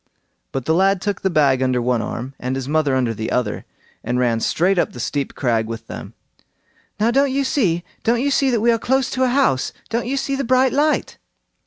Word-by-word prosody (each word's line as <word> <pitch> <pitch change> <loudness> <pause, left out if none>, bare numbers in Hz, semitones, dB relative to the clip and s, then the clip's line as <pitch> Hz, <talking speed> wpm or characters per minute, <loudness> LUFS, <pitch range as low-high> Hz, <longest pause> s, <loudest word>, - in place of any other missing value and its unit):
But 135 -2 -4
the 160 - +2
lad 195 +2 +3
took 205 +2 -3
the 190 - +1
bag 140 -6 +3
under 130 -1 +1
one 120 -1 0
arm, 125 +5 -5
and 125 +1 -2
his 135 -1 -4
mother 150 -2 +1
under 125 -3 +1
the 110 +1 -4
other, 120 -5 -1 0.4
and 120 +2 -1
ran 120 -2 +1
straight 180 +10 +1
up - - 0
the 120 - -9
steep 140 +3 -3
crag 115 -4 0
with 115 0 -6
them. - - -9 0.8
"Now, 225 +3 +3
don't 275 +2 +2
you 275 +1 +1
see! 210 - +1 0.2
don't 235 +1 +2
you 285 - +1
see 270 0 +2
that 235 -4 +1
we 235 +1 +4
are 230 - +1
close 265 +2 0
to 260 - 0
a - - +2
house! 250 - +1 0.2
don't 235 +1 -2
you 275 +2 -1
see 275 0 -1
the 275 - -2
bright 255 +1 +3
light?" 300 +2 0
175 Hz, 225 wpm, -20 LUFS, -, 0.8 s, we